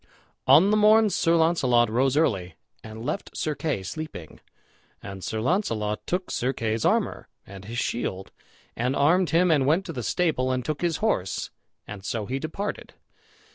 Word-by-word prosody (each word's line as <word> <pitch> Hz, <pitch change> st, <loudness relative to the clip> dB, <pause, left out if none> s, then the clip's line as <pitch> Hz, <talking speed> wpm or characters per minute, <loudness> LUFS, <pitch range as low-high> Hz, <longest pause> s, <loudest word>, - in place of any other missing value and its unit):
On 190 Hz, +6 st, +6 dB
the 215 Hz, -, +3 dB
morn 215 Hz, 0 st, +5 dB
Sir 165 Hz, -2 st, +2 dB
Launcelot 135 Hz, -8 st, +3 dB
rose 130 Hz, +5 st, +1 dB
early 95 Hz, -, 0 dB, 0.3 s
and 110 Hz, +1 st, -9 dB
left -, -, -4 dB
Sir 155 Hz, -, -1 dB
Kay 150 Hz, -10 st, -3 dB
sleeping; 95 Hz, -, -7 dB, 0.6 s
and 100 Hz, -2 st, -8 dB
Sir 110 Hz, -, -3 dB
Launcelot 110 Hz, -, -1 dB
took 180 Hz, +1 st, -2 dB
Sir 130 Hz, +2 st, -1 dB
Kay's 110 Hz, -2 st, -2 dB
armor, -, -, 0 dB, 0.2 s
and 100 Hz, 0 st, -11 dB
his 115 Hz, +3 st, -6 dB
shield, 95 Hz, -5 st, -3 dB, 0.4 s
and 125 Hz, +3 st, -1 dB
armed 170 Hz, +5 st, +3 dB
him, 175 Hz, +1 st, +3 dB
and 140 Hz, -4 st, +3 dB
went 170 Hz, +6 st, +2 dB
to 165 Hz, -, -6 dB
the 125 Hz, -, -4 dB
stable 130 Hz, 0 st, 0 dB
and 130 Hz, -1 st, -2 dB
took 150 Hz, +1 st, -3 dB
his 170 Hz, -2 st, 0 dB
horse, 95 Hz, -, -1 dB, 0.4 s
and 100 Hz, -2 st, -8 dB
so 110 Hz, +1 st, -3 dB
he 130 Hz, +5 st, -3 dB
departed. 160 Hz, +8 st, -5 dB
130 Hz, 170 wpm, -25 LUFS, 110-165 Hz, 0.6 s, On